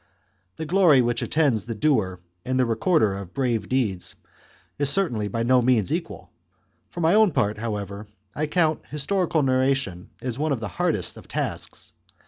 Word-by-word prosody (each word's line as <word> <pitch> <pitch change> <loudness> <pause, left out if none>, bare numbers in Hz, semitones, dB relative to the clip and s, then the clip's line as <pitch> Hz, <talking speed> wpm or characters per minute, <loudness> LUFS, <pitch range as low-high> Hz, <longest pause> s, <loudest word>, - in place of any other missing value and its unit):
The 160 - -5
glory 160 -6 +5
which 120 0 -1
attends 140 -10 +1
the 115 -1 -5
doer 105 - +1 0.2
and 130 0 -1
the 130 - +4
recorder 115 - +2
of 95 -2 -9
brave 125 -5 -1
deeds 110 -9 0 0.6
is 145 -1 +3
certainly 125 - +2
by 115 +2 -2
no 125 +1 +4
means 120 -6 +2
equal. - - -5 0.6
For 175 - -6
my 160 +1 +3
own 215 -1 +5
part, 105 0 0
however, 105 -2 -5 0.3
I 155 +1 -2
count 160 -1 +1
historical 160 +2 0
narration 130 -8 0
as 125 0 -4
one 155 -1 +1
of 130 - -3
the 105 -2 -5
hardest - - -1
of - - -13
tasks. - - -5
130 Hz, 165 wpm, -24 LUFS, 110-150 Hz, 0.6 s, glory